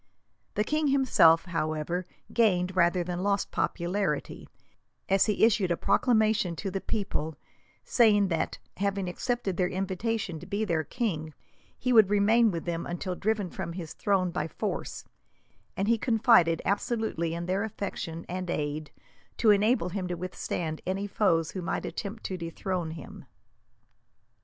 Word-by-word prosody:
The 210 - +2
king 305 +5 0
himself, 255 -13 +5
however, 165 +1 -2 0.3
gained 185 -5 +2
rather 175 0 +3
than 175 0 -4
lost 200 0 0
popularity, 175 -3 -2 0.6
as 195 +2 +3
he 210 0 +4
issued 215 -5 +2
a 170 - +1
proclamation 220 -7 +2
to 195 +4 -4
the 195 0 -3
people, 160 -7 -2 0.5
saying 205 -5 +4
that, 165 -2 -1 0.2
having 200 -1 -1
accepted 200 0 -2
their 180 -1 +1
invitation 195 -1 -2
to 175 - -11
be 210 +2 -1
their 165 -5 0
king, 160 - -3 0.4
he 250 -1 0
would 220 -4 +7
remain 220 +3 +4
with 170 -4 -4
them 170 -1 -3
until 180 +2 -3
driven 205 -1 -1
from 170 - -5
his 170 -3 -6
throne 190 -3 +1
by 160 -3 -2
force; - - -4 0.7
and 195 - 0
he 230 0 +3
confided 220 -9 +4
absolutely 200 -6 -1
in 170 0 -4
their 190 +3 0
affection, 190 -6 -5
and 185 0 -4
aid, 150 -1 -2 0.5
to 220 - +5
enable 205 -2 +3
him 185 0 -3
to 180 - -2
withstand 165 -2 -4
any 195 +2 -1
foes 185 -6 +1
who 185 - -5
might 180 - -2
attempt 220 +2 -5
to 185 - -3
dethrone 170 0 -3
him. 160 -2 -9
185 Hz, 150 wpm, -28 LUFS, 170-210 Hz, 0.7 s, would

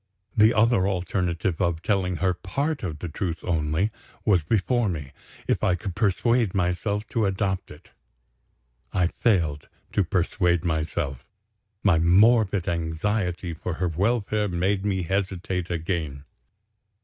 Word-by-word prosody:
The 110 0 +6
other 110 -4 +3
alternative 90 -2 -1
of 85 -2 0
telling 95 -3 +1
her 95 +1 +1
part 140 - -2
of 80 -6 -4
the 85 - -5
truth 85 +1 -4
only 80 +4 0 0.3
was 95 -5 +4
before 110 +6 +1
me, 75 -6 -5 0.4
if - - 0
I 90 - +3
could 90 +1 -5
persuade 115 +1 +2
myself 100 +3 0
to 110 -3 +1
adopt 95 -1 -1
it. - - -14 1.0
I 90 - +2
failed 85 -7 0 0.2
to 100 - +2
persuade 90 -1 +1
myself; 80 -4 -2 0.6
my 90 -6 +4
morbid 100 +2 +4
anxiety 85 +2 -1
for 80 +1 -4
her 90 0 -1
welfare 105 +4 0
made 95 +2 0
me 95 -3 0
hesitate 95 -1 -2
again. 80 -5 -3
90 Hz, 130 wpm, -25 LUFS, 85-100 Hz, 1.0 s, The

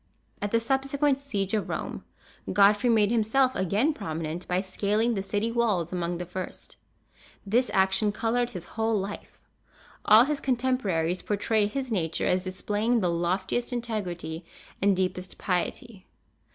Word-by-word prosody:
At 205 - -1
the 230 - +2
subsequent 275 +3 +1
siege 205 -9 -2
of 215 -2 0
Rome, - - -4 0.5
Godfrey 205 +4 +4
made 215 -2 +4
himself 240 +3 +2
again 205 - +1
prominent 165 - -5
by 180 0 +1
scaling 210 +4 0
the 195 - -1
city 205 +3 -1
walls 210 -8 0
among 175 -1 -2
the 180 - -5
first. 185 +1 -7 0.7
This 240 +5 +2
action 190 +2 +2
colored 235 +2 0
his 180 -8 -8
whole 225 0 0
life. 200 +1 -7 0.6
All 215 +2 +8
his 290 +2 -1
contemporaries 230 -10 0
portray 210 +1 +1
his 260 +3 -4
nature 165 -6 0
as 180 0 +2
displaying 210 +5 0
the 180 -2 +1
loftiest 185 +8 -1
integrity 185 -9 -4 0.4
and 195 -1 +3
deepest 185 0 -2
piety. 195 +3 -3
205 Hz, 140 wpm, -27 LUFS, 185-235 Hz, 0.7 s, All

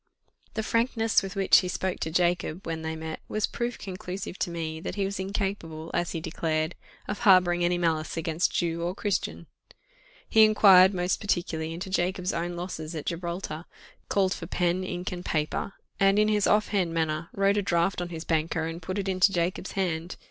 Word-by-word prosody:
The 220 - -1
frankness 230 0 +2
with 195 -1 -6
which 195 -1 +6
he 185 - -3
spoke 185 0 -2
to 160 - -2
Jacob, 175 0 0
when 165 -1 -3
they 160 0 -3
met, 160 0 -6
was 215 -1 0
proof 240 0 -3
conclusive 185 0 -6
to - - 0
me 160 -2 -4
that 170 - -5
he 200 -2 0
was 195 0 -3
incapable, 190 -5 -3
as 175 0 -1
he 165 - -2
declared, 160 -1 -1 0.3
of 205 - -3
harbouring 180 -5 +5
any 175 0 +2
malice 165 -2 0
against 165 +1 0
Jew 170 -1 -1
or 175 +2 -2
Christian. 205 -2 -2 0.8
He 220 - +6
inquired 195 -3 +7
most 180 +1 0
particularly 170 -5 -1
into 180 +3 -6
Jacob's 180 0 0
own 175 +1 -2
losses 170 -2 -5
at 155 - -5
Gibraltar, 170 -1 -4 0.4
called 190 -1 +2
for 165 - -7
pen, 180 0 0
ink, 180 -1 -4
and 180 -1 -6
paper, 155 +5 -2 0.3
and 195 +1 +4
in 215 0 +4
his 210 -2 +2
off 210 0 +3
hand 180 -5 0
manner 160 0 -1
wrote 200 +1 +2
a - - +3
draft 175 0 +1
on 175 - -4
his 165 -2 -6
banker, 160 0 0
and 165 +1 -5
put 185 +4 -4
it 200 -1 -2
into 185 +1 +4
Jacob's 180 +1 -1
hand. 175 -3 -2
180 Hz, 190 wpm, -27 LUFS, 165-195 Hz, 0.8 s, inquired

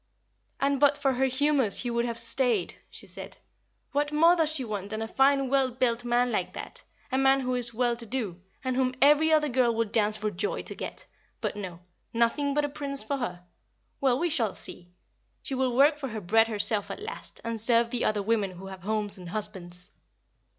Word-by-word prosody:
"And 275 0 +1
but 285 0 +4
for 275 -2 +1
her 260 +1 +1
humors 265 -4 +2
he 245 - -2
would 235 0 0
have 235 -1 -3
stayed," 230 -4 +1 0.2
she - - -8
said. - - -8 0.5
"What 290 +1 0
more 330 +3 +5
does 320 -3 +2
she 280 -5 +1
want 205 -3 -5
than 215 0 -4
a - - -4
fine 275 +2 +3
well 270 0 +2
built 245 -1 0
man 245 0 +1
like - - -2
that - - -8 0.3
a 260 - +1
man 270 0 +4
who 255 -1 -1
is 245 -1 +1
well 240 +1 +1
to 230 -1 -7
do, 210 -8 -3 0.2
and 260 -1 -1
whom 255 0 +1
every 300 +3 +5
other 305 -1 +4
girl 245 -3 +2
would 225 -2 -1
dance 215 -1 +2
for 215 0 -2
joy 425 - -2
to - - 0
get? - - -7 0.3
But - - -3
no; 180 -4 -7 0.3
nothing 255 +5 +1
but 295 0 +2
a - - -3
prince 275 -3 -2
for 275 +6 -2
her. 180 -8 -5 0.5
Well, 260 -3 +2
we 345 +3 0
shall 225 -8 0
see. 175 0 -7 0.5
She - - -5
will 260 -2 0
work 295 +2 +5
for 275 - -4
her 220 -3 -5
bread 225 +5 +3
herself 210 -1 +1
at - - -5
last, 445 +3 -7
and 230 -1 -1
serve 235 0 +3
the 245 - -1
other 210 -1 +1
women 215 -2 +1
who 185 +2 -10
have 190 -1 -9
homes 210 0 -1
and 180 -2 -9
husbands." 180 -3 -4
240 Hz, 215 wpm, -27 LUFS, 215-275 Hz, 0.5 s, more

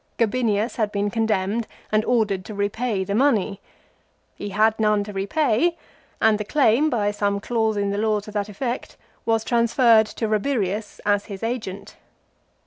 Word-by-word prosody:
Gabinius 230 -1 0
had 215 -3 0
been 205 0 -1
condemned 220 0 0 0.2
and 215 0 +3
ordered 210 -6 +1
to 215 - -7
repay 205 +1 -1
the 200 +1 -3
money. 220 -5 +1 0.7
He 205 - -6
had 215 +2 +2
none 210 -1 +2
to 205 0 -8
repay, 260 - +1 0.4
and 220 -1 +3
the - - -1
claim, 270 +4 +3
by 210 -6 0
some 205 -1 -1
clause 220 0 0
in 200 -1 0
the 200 - -2
law 215 -1 +1
to 210 - -10
that 205 0 -2
effect, 240 +5 -4 0.3
was 225 -1 +2
transferred 235 -1 +4
to 225 - -3
Rabirius 215 -2 -1
as 205 0 +2
his 200 -1 -8
agent. 220 -5 -5
215 Hz, 160 wpm, -23 LUFS, 205-230 Hz, 0.7 s, transferred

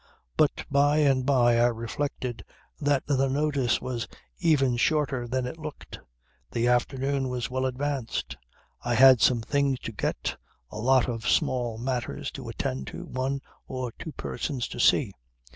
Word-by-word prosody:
But - - +2
by 145 +1 +4
and 135 -4 +3
by 120 -4 +4
I 120 - +5
reflected 120 +1 -3 0.4
that 145 -2 +1
the 135 -1 +1
notice 140 -3 +1
was 125 -2 -4 0.3
even 135 -6 +3
shorter 140 -3 +1
than 130 +1 -1
it 125 +6 -6
looked. 155 -2 -8 0.5
The 120 0 0
afternoon 135 +2 +1
was 125 -1 -3
well 130 0 0
advanced; 130 - -3 0.5
I 120 0 0
had 130 0 +8
some 120 -3 +4
things 140 +3 +1
to - - -5
get, 105 - -2 0.3
a - - -6
lot 130 +2 +4
of 115 -2 -2
small 120 -3 +1
matters 125 0 -3
to - - -8
attend 65 +1 -3
to, - - -7
one 130 +2 -2 0.3
or 130 -2 -4
two 155 +6 -8
persons 135 -5 -3
to - - -7
see. - - +4
130 Hz, 155 wpm, -27 LUFS, 120-140 Hz, 0.5 s, had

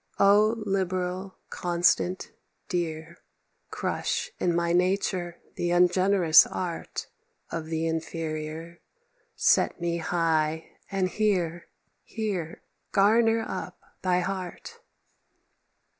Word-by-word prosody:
"O 210 +3 +5
liberal, 185 -1 -2
constant, 175 +1 +1 0.4
dear! 170 -2 -3 0.5
Crush - - -2
in 175 -1 +1
my 170 0 +1
nature 180 -1 0 0.2
the 175 - -1
ungenerous 180 -1 +5
art 175 -3 -4 0.5
Of 160 -1 -4
the 160 0 -2
inferior; 160 0 -4 0.6
set - - +3
me 170 0 -1
high, 160 -2 0 0.2
and 195 -2 0
here, 180 -5 0 0.3
Here 195 -8 -4 0.3
garner 225 +3 +4
up 185 -1 -6 0.2
thy 180 -1 +2
heart." 190 - -5
175 Hz, 90 wpm, -27 LUFS, 165-190 Hz, 0.6 s, O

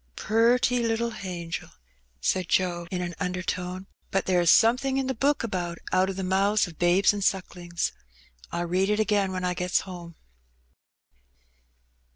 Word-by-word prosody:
^^Purty 240 +3 +3
little 230 0 0
hangel!" 180 -6 -6 0.5
said 185 - 0
Joe, 175 -2 +1
in 180 -1 -2
an 175 0 -4
undertone. 180 0 -3 0.3
'^But 195 - 0
lere 180 -2 +3
is 170 - +3
somethin' 250 +6 +4
in 270 - 0
the 265 - -1
Book 275 +4 +1
about 175 -6 -3
'out 185 +1 +3
of 195 - -4
the 190 - -4
mouths 195 +3 +2
f 170 - -11
babes 175 +4 +4
an' 205 - -4
sucklings.' 175 -3 -1 0.6
I'll 175 0 -2
read 185 +3 +1
it 210 0 +1
again 205 -2 +1
when 185 -1 -3
I 180 0 0
gets 180 0 0
ome." 175 -3 -9
190 Hz, 160 wpm, -26 LUFS, 180-215 Hz, 0.6 s, somethin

